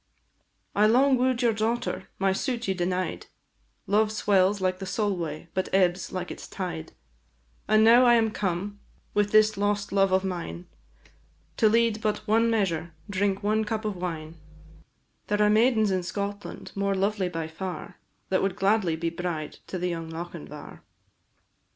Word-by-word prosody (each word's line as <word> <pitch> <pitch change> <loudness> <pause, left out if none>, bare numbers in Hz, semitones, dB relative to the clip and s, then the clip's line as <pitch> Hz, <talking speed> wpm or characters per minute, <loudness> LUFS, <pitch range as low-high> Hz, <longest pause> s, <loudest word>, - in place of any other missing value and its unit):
"I 210 +1 +5
long 260 +4 +5
woo'd 255 0 +1
your 235 -2 +4
daughter, 225 +3 -2
my 195 0 +2
suit 240 +2 -2
you 190 - +2
denied; 180 - -2 0.6
Love 210 +2 +2
swells 200 -2 +2
like 185 -1 0
the 190 - -6
Solway, 180 -6 -2
but 185 - -1
ebbs 185 -1 +2
like 180 -1 -4
its - - -8
tide 170 -4 -5 0.7
And 215 0 +5
now 240 +3 +7
am 235 -2 +5
I - - -10
come, 200 +1 -3 0.3
with 205 0 +1
this 215 0 +5
lost 205 0 0
love 195 -1 +3
of 190 0 +3
mine, 170 - -4 0.9
To 220 - +5
lead 230 -1 +2
but 210 -1 -1
one 225 +2 +3
measure, 170 -7 -1 0.2
drink 200 0 0
one 215 +1 +2
cup 220 0 -3
of 210 -2 -2
wine; 165 -3 -5 0.9
There 210 0 0
are 210 0 +4
maidens 220 -1 +3
in 185 -1 +1
Scotland 200 +3 -5
more 200 0 0
lovely 195 -1 0
by 165 -2 -4
far, 180 +3 -6 0.3
That 190 - +2
would 195 -2 0
gladly 195 -4 +2
be 165 +1 -2
bride 170 -3 -4
to 185 - -4
the 180 0 -1
young 165 -1 -4
Lochinvar." 165 - -8
195 Hz, 160 wpm, -26 LUFS, 180-215 Hz, 0.9 s, now